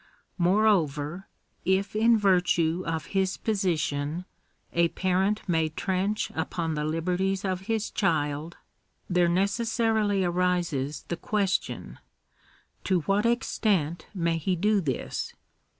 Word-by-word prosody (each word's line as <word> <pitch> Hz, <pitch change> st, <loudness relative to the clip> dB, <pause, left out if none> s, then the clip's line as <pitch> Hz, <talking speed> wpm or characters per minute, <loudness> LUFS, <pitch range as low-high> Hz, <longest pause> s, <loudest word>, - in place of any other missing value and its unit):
Moreover, 175 Hz, -4 st, +2 dB, 0.4 s
if 190 Hz, +3 st, +1 dB
in 225 Hz, +1 st, +5 dB
virtue 180 Hz, -4 st, +2 dB
of 160 Hz, -1 st, -2 dB
his 190 Hz, -1 st, +1 dB
position 170 Hz, -5 st, -1 dB, 0.5 s
a 170 Hz, 0 st, +4 dB
parent 190 Hz, +5 st, 0 dB
may 160 Hz, -3 st, +2 dB
trench 190 Hz, +6 st, -1 dB
upon 160 Hz, 0 st, -2 dB
the 150 Hz, -1 st, -2 dB
liberties 180 Hz, +5 st, -1 dB
of 190 Hz, 0 st, -2 dB
his 225 Hz, -1 st, 0 dB
child, 155 Hz, -3 st, -1 dB, 0.5 s
there 175 Hz, -1 st, +3 dB
necessarily 210 Hz, +1 st, +1 dB
arises 175 Hz, -6 st, 0 dB
the 170 Hz, -, -2 dB
question 200 Hz, 0 st, -1 dB, 0.4 s
— -, -, -34 dB
To 185 Hz, -3 st, +2 dB
what 200 Hz, +7 st, +1 dB
extent 190 Hz, -, 0 dB
may 170 Hz, -2 st, +1 dB
he 180 Hz, +4 st, 0 dB
do 205 Hz, +3 st, +2 dB
this 135 Hz, -7 st, -3 dB
180 Hz, 115 wpm, -27 LUFS, 165-200 Hz, 0.5 s, in